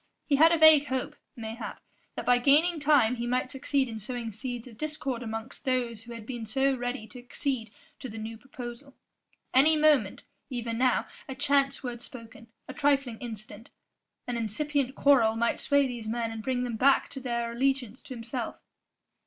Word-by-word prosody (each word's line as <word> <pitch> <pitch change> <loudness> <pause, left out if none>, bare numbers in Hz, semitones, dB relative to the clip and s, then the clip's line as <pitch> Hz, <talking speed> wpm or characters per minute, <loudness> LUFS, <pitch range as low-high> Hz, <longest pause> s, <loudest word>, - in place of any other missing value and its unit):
He 280 - +2
had 325 +3 +7
a 335 - +4
vague 315 -2 +7
hope, 260 -1 -2 0.2
mayhap, 225 0 -6 0.4
that - - -5
by 245 0 +5
gaining 310 +6 +4
time 280 -5 +4
he 240 +1 -3
might 255 +1 0
succeed 270 0 0
in 225 -2 -6
sowing 230 +1 -5
seeds 240 +3 -6
of 235 - -12
discord 295 -5 -3
amongst 225 +1 -6
those 245 -4 -1
who 235 +1 -10
had 230 -2 -9
been 235 -2 -6
so 270 +4 +2
ready 245 -1 -4
to 220 +3 -11
accede 245 -2 -3 0.3
to 260 - -6
the 225 - -8
new 220 +1 -5
proposal; 250 +2 -9 0.6
any 305 +4 +6
moment 305 -2 +3 0.3
even 235 -3 -3
now 255 -1 +3 0.2
a 265 - -4
chance 280 0 +1
word 240 -2 -5
spoken, 230 -2 -11 0.2
a 265 - -7
trifling 275 -5 +1
incident, 220 -1 -8 0.6
an 245 -1 -3
incipient 265 +4 -1
quarrel 250 -7 +4
might 235 +1 0
sway 285 0 +3
these 240 -4 -5
men 230 0 -2
and 225 -1 -6
bring 250 +2 -1
them 240 -3 -3
back 270 +4 +4
to 270 - -6
their 235 -2 -2
allegiance 260 -1 -1
to 260 - -8
himself. 235 0 -5
250 Hz, 180 wpm, -28 LUFS, 230-275 Hz, 0.6 s, had